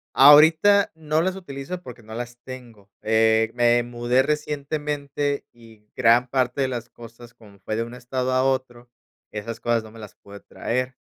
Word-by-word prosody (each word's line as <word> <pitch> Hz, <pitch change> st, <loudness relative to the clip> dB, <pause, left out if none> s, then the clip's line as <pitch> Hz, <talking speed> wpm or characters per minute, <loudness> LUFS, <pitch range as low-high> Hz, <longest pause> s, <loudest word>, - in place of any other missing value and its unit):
Ahorita 160 Hz, +8 st, +6 dB
no 155 Hz, 0 st, -1 dB
las 185 Hz, +1 st, -1 dB
utilizo 175 Hz, 0 st, -7 dB
porque 120 Hz, -4 st, -12 dB
no 110 Hz, -, -11 dB
las 120 Hz, +1 st, -6 dB
tengo, 115 Hz, -6 st, -12 dB
eh, 110 Hz, 0 st, +2 dB
me 120 Hz, 0 st, +3 dB
mudé 120 Hz, +2 st, 0 dB
recientemente 145 Hz, -1 st, -3 dB
y 110 Hz, -3 st, -19 dB
gran 120 Hz, 0 st, +4 dB
parte 130 Hz, +1 st, -1 dB
de 135 Hz, -, +1 dB
las 120 Hz, -2 st, -5 dB
cosas, 120 Hz, +1 st, -14 dB
como 105 Hz, -4 st, -18 dB
fue 110 Hz, -, -4 dB
de 115 Hz, -, -1 dB
un 120 Hz, +1 st, -6 dB
estado 125 Hz, +1 st, -3 dB
a 130 Hz, 0 st, +2 dB
otro, 125 Hz, -2 st, -2 dB, 0.4 s
esas 115 Hz, +2 st, -6 dB
cosas 120 Hz, -1 st, 0 dB
no 110 Hz, -, -12 dB
me 110 Hz, -, -15 dB
las 105 Hz, -3 st, -11 dB
pude 100 Hz, 0 st, -14 dB
traer, 125 Hz, +4 st, -4 dB
125 Hz, 175 wpm, -23 LUFS, 115-140 Hz, 0.4 s, Ahorita